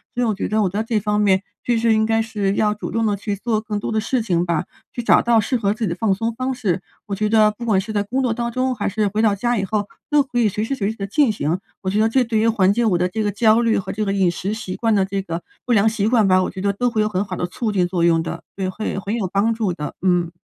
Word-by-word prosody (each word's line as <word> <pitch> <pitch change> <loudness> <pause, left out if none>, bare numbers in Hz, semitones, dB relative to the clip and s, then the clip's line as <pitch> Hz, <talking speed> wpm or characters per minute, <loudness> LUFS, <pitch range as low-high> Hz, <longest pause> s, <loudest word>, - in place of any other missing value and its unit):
所 245 - +1
以 - - +2
我 220 - +1
觉 200 - -3
得 215 0 +1
我 - - +2
在 200 +4 -2
这 225 -1 0
方 210 0 0
面， 195 -2 +3 0.2
确 240 -1 +1
实 225 0 +3
应 220 0 +2
该 225 0 +2
是 210 -3 -1
要 210 0 +2
主 210 - -6
动 225 0 0
地 210 -2 +1
去 205 +1 -3
做 220 0 -1
更 210 -1 -3
多 - - -4
的 220 -1 0
事 245 +3 0
情 175 -6 0
吧， 170 0 -1 0.3
去 240 - -4
找 235 - +5
到 235 -1 +3
适 225 +5 0
合 205 -4 +1
自 220 0 -2
己 - - -1
的 170 - -2
放 215 -1 +1
松 225 +4 -2
方 255 +1 -2
式。 200 -8 -1 0.3
我 200 - -2
觉 210 +2 0
得 215 -1 +5
不 215 +3 -10
管 215 -5 +2
是 215 +3 -5
在 205 -1 +1
工 255 +6 -2
作 250 -3 +1
当 235 +1 -3
中， 255 +1 0
还 205 -3 -1
是 210 +1 0
回 210 +2 -1
到 220 -2 +3
家 240 +4 0
以 195 - 0
后， 205 +1 -1 0.2
都 295 -1 +4
可 265 -3 -4
以 220 -3 +3
随 210 +2 -3
时 275 - -2
随 205 -5 -1
地 220 - -4
地 195 - -4
进 250 +4 +3
行， 170 -3 -1 0.2
我 190 - -2
觉 205 +3 0
得 220 - +3
这 260 +3 +3
对 225 -1 -1
于 225 - +2
缓 200 -3 +3
解 235 - +1
我 200 -6 +2
的 180 - +1
这 215 +4 -3
个 205 - 0
焦 220 +2 +4
虑， 230 -1 +2
和 195 - -3
这 215 - -2
个 195 - -1
饮 195 -3 +2
食 190 +4 -3
习 205 -4 -5
惯 225 -1 +1
的 195 -2 +3
这 195 0 -2
个， 170 -2 -5 0.2
不 250 - -2
良 220 -1 +4
习 215 -2 0
惯 225 -4 +3
吧， 185 0 +4
我 - - -2
觉 190 - -8
得 200 +1 0
都 245 +5 0
会 225 -2 0
有 210 - +2
很 195 -2 -1
好 185 -3 -6
的 - - -1
促 220 +4 -3
进 185 -3 +1
作 175 -2 -1
用 165 -1 +4
的。 165 0 -6
对， 190 -1 -1
会 195 +1 -4
很 200 +4 -3
有 215 -5 -1
帮 210 +3 +2
助 220 -4 -1
的， 150 -4 -5
嗯。 175 -2 +2
210 Hz, 345 characters per minute, -21 LUFS, 195-225 Hz, 0.3 s, 找